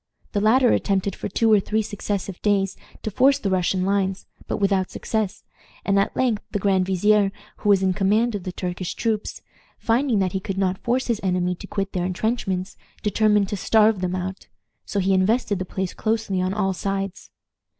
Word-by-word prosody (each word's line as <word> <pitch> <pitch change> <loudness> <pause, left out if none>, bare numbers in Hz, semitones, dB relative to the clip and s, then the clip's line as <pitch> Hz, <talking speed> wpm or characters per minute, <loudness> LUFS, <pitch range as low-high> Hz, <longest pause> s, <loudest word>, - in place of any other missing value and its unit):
The 205 - 0
latter 240 +4 +4
attempted 195 -1 0
for - - -5
two 225 +3 +3
or 210 - +6
three 215 +3 0
successive 200 -2 -4
days 195 -2 +1 0.3
to 215 - -3
force 265 +6 +4
the 200 -8 -2
Russian 185 0 +1
lines, 195 -1 0 0.2
but - - -2
without 195 -2 +1
success, 220 -1 -3 0.4
and 200 0 +3
at 195 - 0
length 240 -5 +1
the - - -2
grand 190 -2 +1
vizier, 200 +2 +3 0.3
who 205 - -1
was 195 -2 +5
in 190 -1 +2
command 215 +5 +2
of 205 - -3
the 185 - -5
Turkish 180 0 -4
troops, 220 -3 -2 0.3
finding 240 +1 +1
that 190 -2 +1
he 190 - -1
could 190 0 -5
not 190 0 0
force 255 +1 0
his 235 -3 0
enemy 180 -1 0
to 190 +3 -10
quit 195 -1 -3
their 180 -1 -1
intrenchments, 190 -1 -2 0.3
determined 210 -1 +3
to 205 - -2
starve 215 0 +3
them 180 0 -1
out; 185 +1 -5 0.4
so 200 - -2
he 195 0 +2
invested 205 +2 +2
the 185 - -3
place 190 0 -3
closely 215 -4 -1
on 185 0 0
all 195 -1 0
sides. 195 0 -4
195 Hz, 190 wpm, -23 LUFS, 185-215 Hz, 0.4 s, or